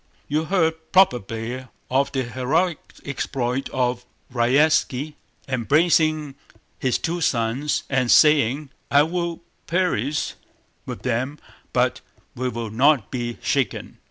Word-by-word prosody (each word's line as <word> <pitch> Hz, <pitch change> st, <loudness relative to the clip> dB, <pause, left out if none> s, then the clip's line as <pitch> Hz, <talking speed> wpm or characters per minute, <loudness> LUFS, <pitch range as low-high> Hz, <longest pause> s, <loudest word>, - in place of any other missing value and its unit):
"You 155 Hz, +2 st, 0 dB
heard 160 Hz, -3 st, 0 dB
probably 125 Hz, -, +1 dB, 0.2 s
of 135 Hz, +2 st, +2 dB
the 135 Hz, -1 st, -1 dB
heroic 135 Hz, +8 st, 0 dB, 0.3 s
exploit 135 Hz, -1 st, -2 dB
of 125 Hz, -1 st, -1 dB, 0.3 s
Raévski, 140 Hz, +3 st, +2 dB, 0.3 s
embracing 150 Hz, +3 st, +2 dB, 0.5 s
his 130 Hz, -2 st, +1 dB
two 170 Hz, +1 st, -3 dB
sons 125 Hz, +2 st, 0 dB
and 130 Hz, -3 st, 0 dB
saying: 145 Hz, -1 st, +4 dB, 0.2 s
'I 145 Hz, +1 st, +5 dB
will 170 Hz, +1 st, -3 dB, 0.3 s
perish 155 Hz, -, 0 dB, 0.5 s
with -, -, -6 dB
them 130 Hz, +4 st, -1 dB, 0.3 s
but -, -, +1 dB, 0.3 s
we 130 Hz, +1 st, -2 dB
will 115 Hz, -3 st, -5 dB
not 130 Hz, 0 st, +3 dB
be 120 Hz, -2 st, -3 dB
shaken! 135 Hz, -3 st, -1 dB
135 Hz, 110 wpm, -23 LUFS, 125-155 Hz, 0.5 s, I